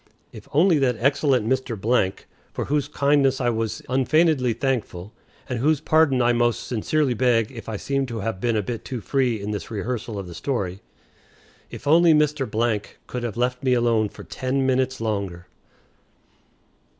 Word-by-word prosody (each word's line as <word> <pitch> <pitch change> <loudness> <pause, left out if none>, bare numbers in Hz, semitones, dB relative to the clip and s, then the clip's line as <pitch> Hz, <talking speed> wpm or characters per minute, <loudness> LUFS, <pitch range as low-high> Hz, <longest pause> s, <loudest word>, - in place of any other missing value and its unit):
If - - -12
only 165 +1 +4
that 130 -3 +2
excellent 135 -1 +2
Mr., 115 -5 +1 0.4
for - - -3
whose 145 -1 0
kindness 140 -2 +2
I 120 -2 +1
was 110 -1 -3
unfeignedly 135 0 +2
thankful 110 -6 -3 0.3
(and 125 -2 -3
whose 150 +3 +2
pardon 155 -5 +3
I 120 0 +3
most 120 0 +1
sincerely 130 +4 0
beg 120 -1 +2
if 115 -3 -9
I 110 - -3
seem 135 +4 -1
to 115 -3 -5
have 100 -3 -3
been 120 -2 +1
a 105 - 0
bit 115 +2 -5
too 130 -3 -5
free 125 -1 0
in 100 +1 -4
this 105 - -5
rehearsal 110 +1 -4
of 100 - -5
the 90 - -9
story), 100 -4 -3 0.9
if - - -10
only 165 +2 +5
Mr. 120 -8 +1 0.2
could 125 - -5
have 115 -2 -4
left 125 +1 0
me 130 -2 +2
alone 115 -3 +2
for - - -12
ten 130 +1 -2
minutes 130 0 +1
longer! 100 -5 -3
125 Hz, 165 wpm, -23 LUFS, 110-135 Hz, 0.9 s, only